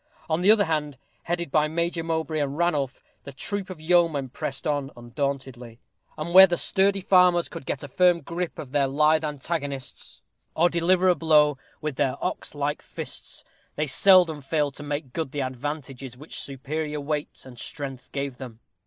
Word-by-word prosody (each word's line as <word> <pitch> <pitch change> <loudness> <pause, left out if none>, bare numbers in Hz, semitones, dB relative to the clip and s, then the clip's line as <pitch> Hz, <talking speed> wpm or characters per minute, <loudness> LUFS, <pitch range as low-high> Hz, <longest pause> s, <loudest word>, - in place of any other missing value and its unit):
On 160 0 0
the 190 - +3
other 215 -2 +6
hand, 150 -4 -2 0.3
headed 170 -3 -2
by 155 0 +3
Major 170 +1 -1
Mowbray 160 -1 -1
and 145 0 -2
Ranulph, 150 -7 0 0.2
the 140 - -8
troop 195 +8 -4
of 185 -4 -8
yeomen 160 -5 +2
pressed 135 +5 -5
on 145 -3 -1
undauntedly; 125 -1 -4 0.4
and 165 +3 -4
where 190 +1 +11
the 175 -1 -1
sturdy 195 +2 +2
farmers 180 -2 +4
could 165 -5 -9
get 140 - -3
a - - -6
firm 175 +4 +3
gripe 170 +3 -4
of 130 - -8
their 140 -1 +2
lithe 155 +3 +3
antagonists, 145 -2 -4 0.3
or 175 +2 +3
deliver 180 +2 +3
a 180 - +6
blow 150 -3 +3 0.2
with 150 -3 -3
their 135 -3 +1
ox - - -4
like - - -2
fists, - - -6 0.3
they 150 - 0
seldom 165 +1 +5
failed 145 0 0
to - - -8
make 145 -3 -4
good 160 -5 -3
the 145 - -2
advantages 130 -1 -5
which 150 +4 -4
superior 150 +3 -3
weight 150 +1 -4
and 125 -2 -10
strength 135 -2 -6
gave 140 -2 -4
them. 125 -4 -9
150 Hz, 175 wpm, -25 LUFS, 135-170 Hz, 0.4 s, where